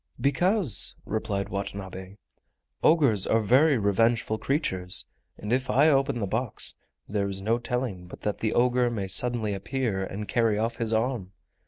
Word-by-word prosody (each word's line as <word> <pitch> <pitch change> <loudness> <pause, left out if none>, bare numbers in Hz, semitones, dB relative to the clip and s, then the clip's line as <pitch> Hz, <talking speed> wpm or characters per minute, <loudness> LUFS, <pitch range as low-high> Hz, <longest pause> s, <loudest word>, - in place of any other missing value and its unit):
"Because," 165 - +2
replied 100 -2 -2
Watanabe, 95 -1 -6 0.7
"ogres 140 - +3
are 115 - +3
very 130 +7 +4
revengeful 110 +2 +1
creatures, 95 - 0 0.3
and 105 +3 -3
if 130 +1 0
I 145 +5 +5
open 135 -2 +2
the 105 - -1
box 110 +4 -2 0.3
there 100 -1 -1
is 95 0 -5
no 110 +4 0
telling 120 -8 -3
but - - -12
that 105 - -2
the 110 - -1
ogre 125 0 +2
may 105 -5 -3
suddenly 110 +2 +2
appear 100 0 -2
and 100 +2 -6
carry 115 -3 +1
off 115 +2 -1
his 115 -1 -2
arm. 110 -4 -1
110 Hz, 155 wpm, -26 LUFS, 100-125 Hz, 0.7 s, I